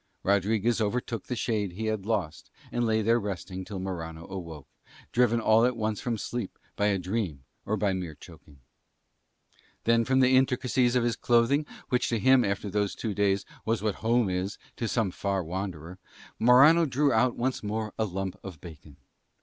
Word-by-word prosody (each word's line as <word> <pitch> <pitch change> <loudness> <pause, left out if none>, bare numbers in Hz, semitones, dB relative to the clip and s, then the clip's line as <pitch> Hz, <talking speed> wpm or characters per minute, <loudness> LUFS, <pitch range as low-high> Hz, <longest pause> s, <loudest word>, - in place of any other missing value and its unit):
Rodriguez 105 +4 +1
overtook 115 +1 -2
the 125 - -2
shade 105 -4 -1
he 110 +5 -4
had 110 -2 -2
lost 95 -9 -2 0.2
and 120 -1 0
lay 110 0 +1
there 115 +2 +3
resting 95 -2 -5
until 95 +1 -6
Morano 85 -3 -5
awoke, 85 -6 -8 0.4
driven 120 -1 +3
all 110 0 +4
at 125 0 +2
once 110 -2 -2
from 120 -2 -2
sleep 120 -1 -5 0.2
by 105 - +1
a 100 -1 +2
dream 90 -6 -3 0.2
or 110 +2 0
by 100 -1 +1
mere 90 -5 -4
choking. 70 -2 -16 1.2
Then 115 0 +3
from 130 +3 +2
the 130 0 +5
intricacies 130 -1 +2
of 125 - +3
his 120 -1 +1
clothing, 120 +5 +2 0.2
which 125 0 +1
to 115 - +1
him 130 +2 +5
after 100 0 -2
those 100 0 -1
two 110 -3 -3
days 100 -1 +1 0.2
was 115 -1 -1
what 105 -2 +1
home 115 0 +2
is 95 +2 -2 0.2
to 115 - -2
some 110 -3 0
far 100 0 -2
wanderer, 90 0 -5 0.4
Morano 140 +8 +6
drew 140 +1 +2
out 120 +2 +2
once 130 +2 -1
more 110 +1 -3
a 110 - +2
lump 95 -1 -4
of 90 -6 -8
bacon. 75 -4 -12
110 Hz, 180 wpm, -28 LUFS, 95-120 Hz, 1.2 s, Morano